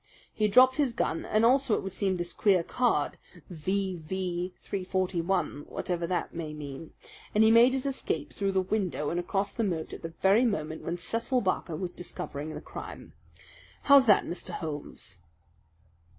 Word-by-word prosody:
He 215 - +1
dropped 255 +5 +6
his 280 -5 +1
gun 165 -7 -1
and 215 +1 +2
also 260 -1 +4
it - - -3
would 190 -1 -5
seem 190 -1 0
this 175 0 -3
queer 190 -5 +3
card 230 -8 0 0.3
V.V. 180 0 -2
341, 185 -4 -1
whatever 175 -2 -2
that 180 0 -2
may 155 -2 -5
mean 145 +1 -8 0.4
and 215 - +6
he 220 - +6
made 235 +3 +7
his 265 0 -2
escape 275 -1 -3
through 195 -1 -1
the 190 0 +2
window 185 -6 -1
and 175 - -1
across 195 +3 -1
the 230 - -1
moat 170 -6 -2
at - - -8
the 165 0 -7
very 200 +5 +5
moment 160 -9 -1
when 170 +1 -3
Cecil 230 +7 -1
Barker 185 -4 -1
was 175 +2 -4
discovering 155 -3 -6
the - - -6
crime. - - -9 0.7
How's 280 -2 +7
that, 205 - +6
Mr. 180 +2 -5
Holmes?" 145 - -6
185 Hz, 165 wpm, -29 LUFS, 165-215 Hz, 0.7 s, made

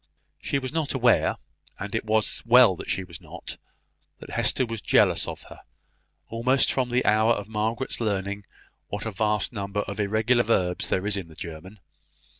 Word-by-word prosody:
She - - -1
was 130 0 -5
not 160 -4 -1
aware, 125 -2 +3 0.4
and 100 0 -6
it 115 - -2
was 110 0 +1
well 120 -4 +6
that - - -9
she 95 - -1
was 85 0 -11
not, 80 - -9 0.6
that - - -11
Hester 130 - +2
was 115 -2 -5
jealous - - +3
of - - -7
her, - - -13 0.7
almost 125 +4 +2
from 130 -2 0
the 125 +1 +1
hour 110 +2 +4
of 105 -2 -5
Margaret's 110 +4 -2
learning 100 -1 -2 0.4
what 105 +2 -5
a 110 - -2
vast 105 +3 0
number 100 -1 -2
of 100 0 -6
irregular 110 +4 +2
verbs 95 -6 0
there 95 - 0
is 105 -1 +1
in 95 -4 -5
the 80 - -15
German. 85 +6 -9
105 Hz, 180 wpm, -25 LUFS, 100-120 Hz, 0.7 s, well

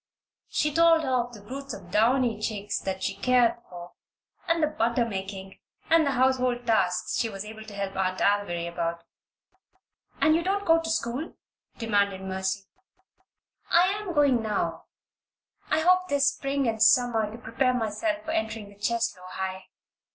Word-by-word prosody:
She 300 -1 0
told 330 0 +5
her 260 -3 -1
of 245 -1 0
the 210 - -12
broods 275 +3 -6
of 175 -1 -13
downy 230 +1 +2
chicks 210 -2 -2
that 190 0 -4
she 195 - 0
cared 245 +2 +3
for, 175 -1 -10 0.6
and 335 -1 +2
the - - +7
butter 235 -4 0
making, 190 -2 -6 0.3
and 325 -2 +5
the - - +2
household 255 -1 +1
tasks 190 -6 +1
she 230 - 0
was 195 -1 -6
able 220 0 -9
to 210 -2 -10
help 195 -1 -4
Aunt 185 -1 -1
Alviry 200 -4 +1
about. 170 0 -3 1.2
"And 310 - +4
don't 395 +2 0
you - - -11
go 330 0 +4
to 325 - -5
school?" 290 -1 -2 0.4
demanded 200 -4 0
Mercy. 190 +1 -3 1.0
"I 355 +2 +5
am 400 -3 -4
going 280 -5 +4
now. 195 -7 -2 0.8
I 310 +1 +2
hope 365 +2 +4
this 285 -1 +3
spring 275 -1 -2
and 220 -1 -2
summer 225 -2 +4
to 225 - -8
prepare 250 +2 0
myself 280 +8 -2
for 315 - -3
entering 220 -8 -3
the 200 0 -18
Cheslow 225 -5 -1
High." 190 0 -5
230 Hz, 165 wpm, -27 LUFS, 195-275 Hz, 1.2 s, the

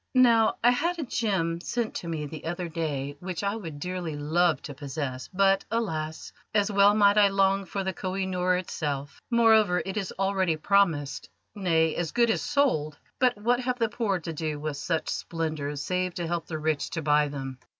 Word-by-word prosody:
Now, 235 -3 +5
I 240 - +7
had 335 +8 0
a 325 - -2
gem 190 - -1
sent 235 +2 -2
to 170 - -7
me 160 -3 -3
the 155 +2 -8
other 175 +1 -3
day 145 -4 -3
which 180 0 -5
I 200 +1 0
would 165 -9 -7
dearly 180 -1 -4
love 155 +1 +2
to 145 - -6
possess, 135 -2 -5
but, 195 +1 +3
alas! 160 -9 -3 0.2
as 205 0 +2
well 200 +1 +5
might 205 0 +5
I 205 - +7
long 195 0 +2
for 195 +1 -3
the 190 0 -2
Koh 185 +1 -4
i 195 -1 -1
Noor 180 -1 +1
itself. 145 -5 -4
Moreover, 220 -6 +4
it 195 +2 -4
is 195 -3 -2
already 190 -3 +1
promised 160 -5 +1 0.2
nay, 165 -5 +2
as 170 -3 -2
good 235 -1 +3
as - - 0
sold. 155 - +1 0.2
But 250 -4 +3
what 240 +4 +1
have 250 0 -1
the 230 -2 +1
poor 215 -4 0
to 165 -1 -6
do 155 -1 -3
with 150 -1 -4
such 160 +3 -2
splendours 155 -3 -3
save 180 +1 -1
to 175 -2 -3
help 170 0 -3
the 160 - -4
rich 155 -1 -1
to 165 - -2
buy 150 0 +3
them!" 135 -2 -6
180 Hz, 200 wpm, -27 LUFS, 155-205 Hz, 0.2 s, I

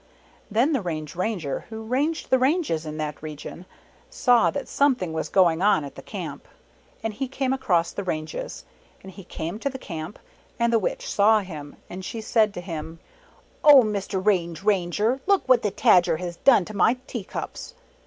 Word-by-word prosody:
Then 240 +9 +2
the 270 - +1
Range 155 -4 -5
Ranger 180 -7 -2
who 220 0 -7
ranged 280 +8 -1
the 260 - +5
ranges 260 - +1
in 155 0 -5
that 150 -1 -4
region, 155 +3 -8 0.4
saw 245 -3 +3
that 285 - -4
something 250 - +1
was 160 - -3
going 175 -3 +3
on 195 -7 +3
at 140 - -9
the - - -10
Camp, - - -7 0.6
and 225 -1 -2
he 270 +5 -3
came 265 0 -1
across 180 -11 +1
the 200 - -5
ranges. 175 - -5 0.4
And 190 - -10
he 195 +1 -12
came 170 +3 -5
to 280 - -1
the 265 - -7
Camp, 165 -5 -7 0.4
and 235 0 +1
the 230 - +5
Witch - - -3
saw 215 - +4
him, 155 -6 -9
and 185 +1 -8
she 225 - -5
said 220 -1 +2
to 175 - -5
him, 165 -2 -6 0.7
"Oh, 285 -4 +9
Mr. 200 -3 -3
Range 175 -4 +1
Ranger, 210 +5 +1
look 395 -6 +2
what 255 -2 +5
the 210 - 0
Tajer 190 -5 +4
has 175 0 -6
done 240 -9 +5
to 215 - -9
my 225 +6 +3
tea 235 -6 -5
cups - - -7
205 Hz, 185 wpm, -24 LUFS, 170-250 Hz, 0.7 s, Oh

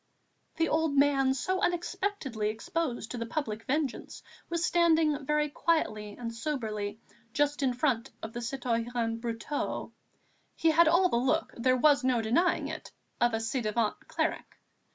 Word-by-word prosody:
The 330 0 +1
old 315 -2 +1
man 275 -2 +4
so 370 +9 -1
unexpectedly 350 - -1
exposed 235 +2 -3
to 245 - -4
the 230 - -2
public 225 -5 -3
vengeance 280 -1 -2 0.3
was 340 0 0
standing 320 -4 +3
very 300 0 +2
quietly 215 -10 -1
and 230 -1 -5
soberly 220 -6 -3 0.3
just 290 0 +1
in 255 -3 +1
front 250 -3 0
of 220 0 -6
the 240 - -4
citoyen 235 -2 -2
Brotteaux. 235 +5 -3 0.6
He 325 - +3
had 330 +1 +5
all 355 +3 +5
the 235 - +1
look, 270 +7 +1
there 255 +2 +2
was 285 +1 +4
no 255 -2 +2
denying 245 +11 +2
it, - - -7 0.3
of 240 -1 +3
a - - -1
ci 230 +3 -1
devant 215 0 -1
cleric. - - -2
265 Hz, 155 wpm, -30 LUFS, 230-310 Hz, 0.6 s, had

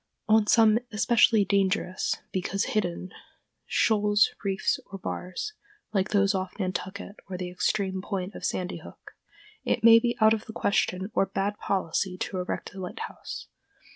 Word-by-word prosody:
On 215 -1 +4
some 225 0 +5
especially 220 -1 +4
dangerous—because 195 -1 0
hidden—shoals, 205 +2 0
reefs, 195 -1 0
or 195 - -7
bars, 185 - -5 0.4
like 195 -1 +1
those 200 -1 +3
off 185 -1 -3
Nantucket 190 +1 -4
or 185 - -4
the 180 -1 -5
extreme 190 +1 -1
point 195 0 -4
of - - -9
Sandy 180 0 -2
Hook, - - -13 0.5
it 230 - 0
may 230 0 +9
be 240 0 -1
out 220 0 +6
of 220 0 -3
the 220 - -8
question 190 -1 0
or 195 - +2
bad 195 +2 -2
policy 185 0 -1
to 185 0 -3
erect 180 - -4
a 195 - -9
lighthouse. 180 -1 -7
195 Hz, 140 wpm, -27 LUFS, 185-215 Hz, 0.5 s, may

